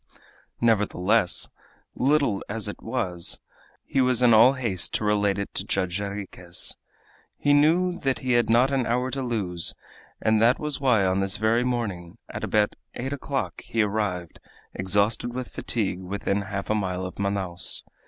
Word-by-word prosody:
Nevertheless, 105 -3 +2 0.5
little 140 -6 +2
as 110 +1 -1
it 105 - -7
was, 95 -8 -2 0.5
he 135 - +1
was 125 -1 +3
in 120 -2 +6
all 115 +4 +7
haste 115 -9 0
to - - -1
relate 105 -1 +2
it 100 - -4
to - - -2
Judge 95 -1 -1
Jarriquez. 100 -3 -3 0.6
He 145 - +2
knew 175 +5 +3
that 135 -4 0
he 130 - -2
had 120 -2 +3
not 120 +4 +4
an 135 -3 +1
hour 125 +2 0
to 135 +2 -3
lose, 100 -9 -1 0.4
and 110 0 +2
that 120 +3 +5
was 150 -2 -3
why 120 -8 +3
on 95 +1 +1
this 95 -1 0
very 110 +3 +2
morning, 105 -7 -3
at - - -6
about 105 -1 +2 0.2
eight 135 +3 -3
o'clock, 135 - -3
he 115 -1 0
arrived, 100 -5 -2 0.3
exhausted 105 +5 +1
with 130 -1 -4
fatigue, 95 -5 -2
within 100 +2 -2
half 100 +1 -4
a - - +4
mile 95 -3 -2
of 90 - -8
Manaos. 100 -3 -2
110 Hz, 165 wpm, -25 LUFS, 95-125 Hz, 0.6 s, all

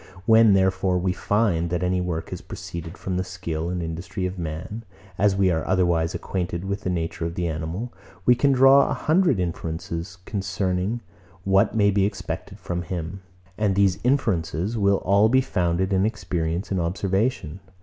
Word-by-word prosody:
When, 110 -1 +6
therefore, 95 -1 +2
we 90 0 0
find, 95 -4 +1
that 90 +1 -1
any 90 0 +1
work 85 -2 -3
has - - -5
proceeded 85 +2 -8
from 95 -1 -3
the 90 - 0
skill 85 -3 -4
and 90 -1 -2
industry 85 +3 -4
of 90 0 -4
man; 85 +7 -5 0.4
as 100 -1 +3
we 95 -1 +3
are 80 -2 0
otherwise 85 -3 +1
acquainted 90 -1 -3
with 100 +1 -3
the 95 - -2
nature 85 -2 -2
of 85 0 -3
the 90 -1 -1
animal, 80 +9 -4 0.3
we 125 - +7
can 140 +3 +2
draw 135 +1 +6
a - - 0
hundred 160 - +2
inferences 85 +1 -4
concerning 95 +2 -2 0.4
what 95 +3 +3
may 100 -2 +4
be 100 0 +2
expected 100 -1 -6
from 90 0 -3
him; 90 +1 -5 0.4
and 105 -3 +2
these 100 -2 +3
inferences 105 - 0
will 100 -2 +3
all 100 +3 +4
be 130 +2 +5
founded 95 -6 0
in 95 0 +3
experience 90 -4 -2
and 95 -2 +1
observation. 95 0 -1
95 Hz, 170 wpm, -24 LUFS, 85-100 Hz, 0.4 s, we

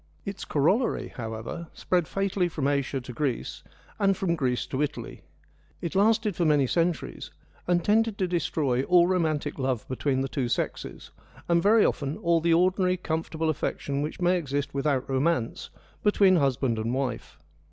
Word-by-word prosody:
Its 200 0 -5
corollary, 190 - +1
however, 115 +8 -6
spread 175 -3 0
fatally 195 -2 0
from 150 -4 -2
Asia 140 -1 0
to 125 0 -9
Greece, 130 -1 -2 0.4
and 195 -2 +3
from 185 -3 0
Greece 125 -5 -1
to 135 - -3
Italy. 150 - -4 0.6
It 170 - -4
lasted 210 0 +2
for 175 - 0
many 150 -4 +4
centuries, 170 +4 -1 0.4
and 175 -1 +1
tended 220 0 +2
to 185 - 0
destroy 150 -7 0
all 175 +4 +5
romantic 155 -6 0
love 130 -4 -1
between 130 +1 -1
the 135 - -1
two 130 -3 -2
sexes, - - -3 0.4
and 170 0 +3
very 215 +4 +5
often 140 +1 -1
all 170 -1 +2
the 170 +1 +2
ordinary 185 +2 +3
comfortable 160 -1 -2
affection 140 -1 -3
which 150 +2 -4
may 180 +1 +3
exist 145 -3 -3
without 140 -1 0
romance 135 -2 -1 0.3
between 195 -3 +4
husband 135 -5 +1
and 115 +3 -1
wife. 130 -2 -3
160 Hz, 160 wpm, -27 LUFS, 135-180 Hz, 0.6 s, all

